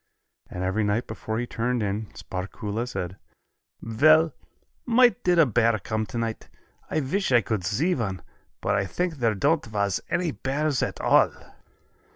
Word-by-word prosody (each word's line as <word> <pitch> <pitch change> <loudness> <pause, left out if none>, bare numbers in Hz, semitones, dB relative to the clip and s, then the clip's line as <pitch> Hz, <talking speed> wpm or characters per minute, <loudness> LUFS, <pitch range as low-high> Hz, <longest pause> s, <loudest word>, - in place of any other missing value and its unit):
And 90 - -5
every 95 +4 0
night 105 +4 0
before 110 0 -5
he 120 - -1
turned 120 0 -1
in, 105 +2 -2
Sparkuhle 100 +5 -4
said: 95 -4 -5 0.7
"Vell, 155 +8 +4 0.5
might 245 0 +4
did 180 -1 +3
a 165 - +7
bear 115 -2 +2
come 110 +3 -3
tonight. 115 -2 -4 0.4
I 155 - 0
wish 185 +6 -1
I 120 -1 +6
could 110 -4 -2
see 125 - +1
one, 95 - -3 0.4
but 100 - 0
I 100 -1 0
think 175 - -2
there 115 -4 +1
don't 145 +9 +2
vas 100 -4 -1
any 175 -2 0
bears 145 0 -1
at - - -2
all." - - +4
115 Hz, 160 wpm, -25 LUFS, 105-155 Hz, 0.7 s, a